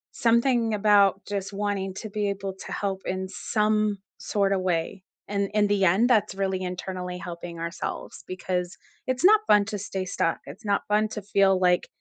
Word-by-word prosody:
Something 235 Hz, -1 st, +2 dB
about 200 Hz, -2 st, +4 dB
just 200 Hz, -1 st, -4 dB
wanting 195 Hz, -2 st, -2 dB
to 215 Hz, -, -6 dB
be 205 Hz, 0 st, -1 dB
able 195 Hz, -1 st, -4 dB
to 190 Hz, -, -10 dB
help 195 Hz, -1 st, -3 dB
in 190 Hz, 0 st, -3 dB
some 210 Hz, -1 st, 0 dB, 0.2 s
sorta 195 Hz, -2 st, 0 dB
way, 185 Hz, +1 st, -2 dB, 0.2 s
and 200 Hz, -1 st, 0 dB
in 210 Hz, -1 st, +3 dB
the 200 Hz, -2 st, +2 dB
end, 205 Hz, +8 st, +4 dB
that's 210 Hz, -5 st, +2 dB
really 190 Hz, -1 st, -1 dB
internally 180 Hz, 0 st, -4 dB
helping 170 Hz, -1 st, -7 dB
ourselves, 170 Hz, +1 st, -5 dB
because 185 Hz, 0 st, -3 dB, 0.3 s
it's 255 Hz, +2 st, -1 dB
not 425 Hz, +3 st, +7 dB
fun 210 Hz, -1 st, +6 dB
to 210 Hz, -1 st, -4 dB
stay 195 Hz, -1 st, -4 dB
stuck. 175 Hz, -2 st, -1 dB
It's 190 Hz, +11 st, -11 dB
not 200 Hz, -1 st, 0 dB
fun 215 Hz, +1 st, +3 dB
to 210 Hz, -, -5 dB
feel 195 Hz, -1 st, +3 dB
like 180 Hz, -1 st, +2 dB
195 Hz, 175 wpm, -26 LUFS, 185-210 Hz, 0.3 s, not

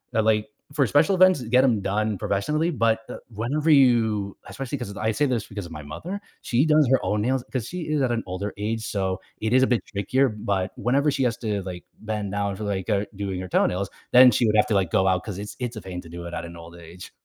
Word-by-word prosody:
uh 110 Hz, -, +4 dB
like, 105 Hz, -1 st, +2 dB, 0.3 s
for 140 Hz, -2 st, +3 dB
special 150 Hz, -, +3 dB
events, 185 Hz, -5 st, +5 dB
get 125 Hz, +2 st, +3 dB
'em 120 Hz, -6 st, +2 dB
done 105 Hz, +2 st, 0 dB
professionally, 150 Hz, -, 0 dB
but, 115 Hz, -7 st, +1 dB
uh, -, -, -6 dB, 0.2 s
whenever 140 Hz, +9 st, 0 dB
you 115 Hz, -8 st, +3 dB
especially, 135 Hz, +1 st, -5 dB
'cause 100 Hz, -6 st, -6 dB
I 110 Hz, +2 st, 0 dB
say 110 Hz, +7 st, +1 dB
this 125 Hz, -5 st, -1 dB
because 100 Hz, -2 st, -6 dB
of 85 Hz, -, -11 dB
my 75 Hz, -1 st, -7 dB
mother, 170 Hz, -, -6 dB, 0.2 s
she 125 Hz, +2 st, +2 dB
does 155 Hz, -2 st, +4 dB
her 130 Hz, -, +3 dB
own 105 Hz, +3 st, 0 dB
nails- 130 Hz, +2 st, 0 dB
'cause 120 Hz, -4 st, -2 dB
she 180 Hz, 0 st, -5 dB
is 155 Hz, -2 st, +1 dB
at 125 Hz, -, +1 dB
an 115 Hz, -1 st, 0 dB
older 95 Hz, +3 st, -4 dB
age 110 Hz, +2 st, -2 dB
so, 95 Hz, -3 st, -2 dB, 0.2 s
it 110 Hz, -, -1 dB
is 130 Hz, +1 st, +5 dB
a -, -, +4 dB
bit 120 Hz, -2 st, +1 dB
trickier, 130 Hz, +7 st, +1 dB
but 100 Hz, -3 st, -2 dB
whenever 140 Hz, +5 st, +2 dB
she 135 Hz, -1 st, 0 dB
has 120 Hz, -2 st, 0 dB
to, 105 Hz, -4 st, -2 dB
like, 90 Hz, -1 st, -7 dB, 0.2 s
bend 105 Hz, -2 st, -3 dB
down 100 Hz, -1 st, -1 dB
for, 105 Hz, +2 st, -6 dB
like 95 Hz, -2 st, -2 dB
uh, 105 Hz, -1 st, +1 dB
doing 95 Hz, -2 st, -3 dB
her 95 Hz, -, -6 dB
toenails, 95 Hz, +2 st, +1 dB, 0.2 s
then 125 Hz, +1 st, +9 dB
she 120 Hz, -, +2 dB
would 105 Hz, -, +2 dB
have 105 Hz, -, +4 dB
to, 110 Hz, -, +1 dB
like, 95 Hz, -4 st, +1 dB
go 95 Hz, -, +3 dB
out 90 Hz, -1 st, +2 dB
because 100 Hz, -3 st, -6 dB
it's 105 Hz, 0 st, -7 dB
it's 125 Hz, -1 st, -4 dB
a -, -, -6 dB
pain 90 Hz, -2 st, -6 dB
to 85 Hz, -, -14 dB
do 85 Hz, +1 st, -8 dB
it 85 Hz, -, -7 dB
at -, -, -4 dB
an 85 Hz, 0 st, -10 dB
old 85 Hz, 0 st, -12 dB
age. 85 Hz, +2 st, -11 dB
110 Hz, 260 wpm, -24 LUFS, 95-130 Hz, 0.3 s, then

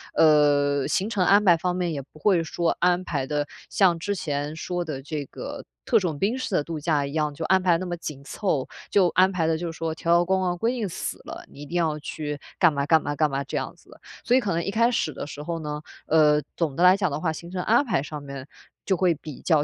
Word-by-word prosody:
呃， 145 Hz, -2 st, +4 dB
行 195 Hz, -, 0 dB
程 205 Hz, -5 st, +1 dB
安 200 Hz, +2 st, +5 dB
排 175 Hz, -3 st, +7 dB
方 180 Hz, +2 st, -1 dB
面 175 Hz, -2 st, -1 dB
也 140 Hz, -, -3 dB
不 140 Hz, +3 st, -18 dB
会 180 Hz, -2 st, +3 dB
说 165 Hz, +1 st, 0 dB
安 180 Hz, +1 st, +2 dB
排 135 Hz, -6 st, -2 dB
得 145 Hz, 0 st, -1 dB, 0.2 s
像 180 Hz, -4 st, +3 dB
之 200 Hz, +4 st, -2 dB
前 145 Hz, -3 st, -3 dB
说 175 Hz, +2 st, -3 dB
的 145 Hz, -4 st, -5 dB
这 145 Hz, 0 st, -4 dB
个 -, -, -8 dB, 0.2 s
特 -, -, +4 dB
种 170 Hz, -6 st, -2 dB
兵 210 Hz, +5 st, +1 dB
式 235 Hz, -6 st, -2 dB
的 150 Hz, -, +2 dB
度 165 Hz, 0 st, -5 dB
假 150 Hz, -2 st, +1 dB
一 140 Hz, -, -6 dB
样， 155 Hz, -1 st, 0 dB
就 160 Hz, -, -4 dB
安 190 Hz, 0 st, +3 dB
排 180 Hz, -2 st, +3 dB
那 185 Hz, -, -4 dB
么 175 Hz, -1 st, -3 dB
紧 145 Hz, -4 st, -7 dB
凑， 145 Hz, -3 st, -2 dB, 0.2 s
就 195 Hz, -3 st, +4 dB
安 185 Hz, +2 st, +4 dB
排 175 Hz, -4 st, 0 dB
得 165 Hz, -, +2 dB
就 170 Hz, 0 st, -4 dB
是 165 Hz, -, -12 dB
说 165 Hz, -1 st, -2 dB
条 165 Hz, +1 st, -1 dB
条 175 Hz, 0 st, +4 dB
框 190 Hz, +1 st, +2 dB
框 180 Hz, -1 st, 0 dB
规 225 Hz, +6 st, +1 dB
定 225 Hz, -6 st, -2 dB
死 -, -, -5 dB
了， -, -, -8 dB
你 140 Hz, -, -12 dB
一 -, -, -7 dB
定 175 Hz, +4 st, -2 dB
要 160 Hz, -3 st, 0 dB
去 150 Hz, 0 st, -5 dB, 0.2 s
干 175 Hz, -4 st, +5 dB
嘛 140 Hz, -1 st, -1 dB
干 160 Hz, 0 st, +5 dB
嘛 145 Hz, -, -3 dB
干 155 Hz, 0 st, +2 dB
嘛 135 Hz, 0 st, -2 dB
这 -, -, -4 dB
样 -, -, -4 dB
子 -, -, -24 dB
的。 -, -, -16 dB, 0.2 s
所 245 Hz, -, +3 dB
以 -, -, +5 dB
可 210 Hz, -6 st, -2 dB
能 170 Hz, +1 st, -1 dB
一 195 Hz, -, -2 dB
开 230 Hz, +3 st, +3 dB
始 160 Hz, -10 st, -1 dB
的 140 Hz, -, -6 dB
时 150 Hz, 0 st, -8 dB
候 165 Hz, +1 st, -3 dB
呢， 150 Hz, -1 st, -5 dB, 0.3 s
呃， 150 Hz, -1 st, +4 dB, 0.2 s
总 160 Hz, -5 st, -1 dB
的 170 Hz, -, +1 dB
来 180 Hz, +1 st, +7 dB
讲 190 Hz, -3 st, +1 dB
的 140 Hz, -, -2 dB
话， 160 Hz, 0 st, 0 dB
行 170 Hz, +2 st, -9 dB
程 185 Hz, -1 st, -2 dB
安 240 Hz, +6 st, +3 dB
排 220 Hz, -, +1 dB
上 150 Hz, 0 st, -7 dB
面 140 Hz, -1 st, -8 dB, 0.4 s
就 190 Hz, -, +2 dB
会 180 Hz, -1 st, +3 dB
比 150 Hz, -2 st, -10 dB
较 155 Hz, -4 st, +3 dB
165 Hz, 290 characters per minute, -25 LUFS, 150-185 Hz, 0.4 s, 排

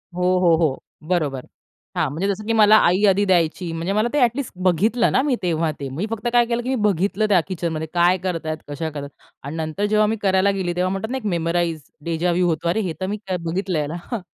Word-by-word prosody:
हो, 180 Hz, -, -3 dB, 0.2 s
हो, 170 Hz, -3 st, +4 dB
हो. 155 Hz, -5 st, 0 dB, 0.2 s
बरोबर. 150 Hz, -8 st, -1 dB, 0.5 s
हां, -, -, +1 dB
म्हणजे 175 Hz, +7 st, -2 dB
जसं 200 Hz, +1 st, -2 dB
की 230 Hz, -, 0 dB
मला 215 Hz, -1 st, +6 dB
आई 185 Hz, +4 st, +2 dB
आधी 200 Hz, +2 st, +3 dB
द्यायची. 175 Hz, -1 st, +1 dB
म्हणजे 170 Hz, +4 st, -2 dB
मला 215 Hz, +3 st, +2 dB
ते 295 Hz, -, +2 dB
अ‍ॅटलिस्ट 245 Hz, +2 st, +1 dB
बघितलं 215 Hz, +7 st, +2 dB
ना, 260 Hz, -, +3 dB
मी 275 Hz, -3 st, +1 dB
तेव्हा 165 Hz, -2 st, 0 dB
ते. 140 Hz, -1 st, -5 dB
मी 160 Hz, +10 st, -3 dB
फक्त 225 Hz, +1 st, -3 dB
काय 240 Hz, -1 st, +5 dB
केलं, 235 Hz, 0 st, -1 dB
की 255 Hz, -, -4 dB
मी 265 Hz, -, +1 dB
बघितलं, 205 Hz, +1 st, +1 dB
त्या 190 Hz, -3 st, +5 dB
किचनमध्ये 165 Hz, -4 st, -3 dB
काय 175 Hz, +1 st, +4 dB
करतायेत, 160 Hz, -4 st, -2 dB
कशा 160 Hz, +2 st, -4 dB
करतायत 140 Hz, -2 st, -9 dB, 0.2 s
आणि 145 Hz, +3 st, -6 dB
नंतर 160 Hz, +5 st, -2 dB
जेव्हा 215 Hz, 0 st, +3 dB
मी 220 Hz, -, 0 dB
करायला 195 Hz, 0 st, +3 dB
गेली, 180 Hz, -3 st, -2 dB
तेव्हा 180 Hz, +1 st, +1 dB
म्हणतात 220 Hz, +5 st, -3 dB
ना, 265 Hz, -, -1 dB
एक 225 Hz, -, -8 dB
मेमोराइज, 170 Hz, -1 st, -1 dB, 0.2 s
डेजा 170 Hz, +1 st, 0 dB
वू 180 Hz, +1 st, +2 dB
होतो. 170 Hz, 0 st, -1 dB
अरे, 220 Hz, -, +1 dB
हे 175 Hz, -5 st, -2 dB
तर -, -, 0 dB
मी 210 Hz, +2 st, -2 dB, 0.3 s
बघितलं 170 Hz, -3 st, -1 dB
ना. 160 Hz, -, -5 dB, 0.2 s
हां. 235 Hz, -, -1 dB
180 Hz, 230 wpm, -21 LUFS, 165-210 Hz, 0.5 s, मला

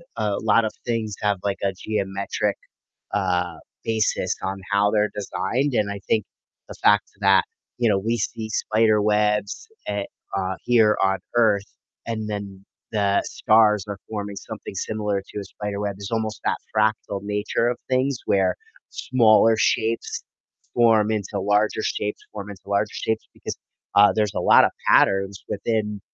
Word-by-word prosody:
a 105 Hz, -3 st, -1 dB
lot 110 Hz, +1 st, +3 dB
of 110 Hz, -, -1 dB
things 110 Hz, -4 st, -2 dB
have 105 Hz, -1 st, +2 dB
like 100 Hz, -1 st, -1 dB
a 95 Hz, -, +1 dB
geometric, 100 Hz, 0 st, -2 dB, 0.6 s
uh, 90 Hz, -4 st, 0 dB, 0.3 s
basis 110 Hz, -1 st, 0 dB
on 95 Hz, +1 st, -3 dB
how 100 Hz, 0 st, +3 dB
they're 105 Hz, -1 st, +2 dB
designed 115 Hz, +7 st, -1 dB
and 105 Hz, -3 st, +1 dB
I 100 Hz, -, -5 dB
think 110 Hz, -3 st, +2 dB, 0.4 s
the -, -, -8 dB
fact 105 Hz, 0 st, +5 dB
that, 95 Hz, -1 st, +5 dB, 0.3 s
you 120 Hz, -, +3 dB
know, 100 Hz, -2 st, +3 dB
we 115 Hz, +4 st, -1 dB
see 110 Hz, +1 st, -3 dB
spiderwebs, 105 Hz, -, +1 dB, 0.2 s
eh 100 Hz, 0 st, -1 dB, 0.3 s
uh, 95 Hz, -1 st, -1 dB
here 110 Hz, -3 st, +4 dB
on 95 Hz, 0 st, +2 dB, 0.2 s
Earth, 105 Hz, -4 st, +4 dB, 0.4 s
and 110 Hz, -2 st, -3 dB
then 100 Hz, -2 st, -6 dB, 0.3 s
the 100 Hz, -2 st, +2 dB
stars 105 Hz, -2 st, +3 dB
are 100 Hz, -, -4 dB
forming 105 Hz, -2 st, -4 dB
something 95 Hz, -, -8 dB
similar 105 Hz, 0 st, -2 dB
to -, -, -7 dB
a -, -, -6 dB
spiderweb. 100 Hz, 0 st, -4 dB
There's 100 Hz, -1 st, -7 dB
almost 110 Hz, -2 st, -2 dB
that -, -, +1 dB, 0.2 s
fractal 105 Hz, -2 st, +1 dB
nature 105 Hz, +3 st, 0 dB
of 120 Hz, -, -2 dB
things 130 Hz, 0 st, +1 dB
where 95 Hz, -2 st, +2 dB, 0.3 s
smaller 115 Hz, -3 st, +4 dB
shapes 115 Hz, +1 st, 0 dB, 0.5 s
form 110 Hz, -3 st, +4 dB
into 100 Hz, -1 st, -2 dB
larger 105 Hz, +2 st, +1 dB
shapes, 105 Hz, -1 st, -2 dB
form 105 Hz, -1 st, -7 dB
into 100 Hz, -3 st, -10 dB
larger 100 Hz, +1 st, 0 dB
shapes, 110 Hz, 0 st, -2 dB
because, -, -, -6 dB, 0.4 s
uh, 105 Hz, 0 st, +7 dB
there's 105 Hz, -2 st, 0 dB
a -, -, -1 dB
lotta -, -, +6 dB, 0.2 s
patterns 95 Hz, 0 st, +3 dB
within, 105 Hz, 0 st, -2 dB
105 Hz, 150 wpm, -23 LUFS, 100-110 Hz, 0.6 s, uh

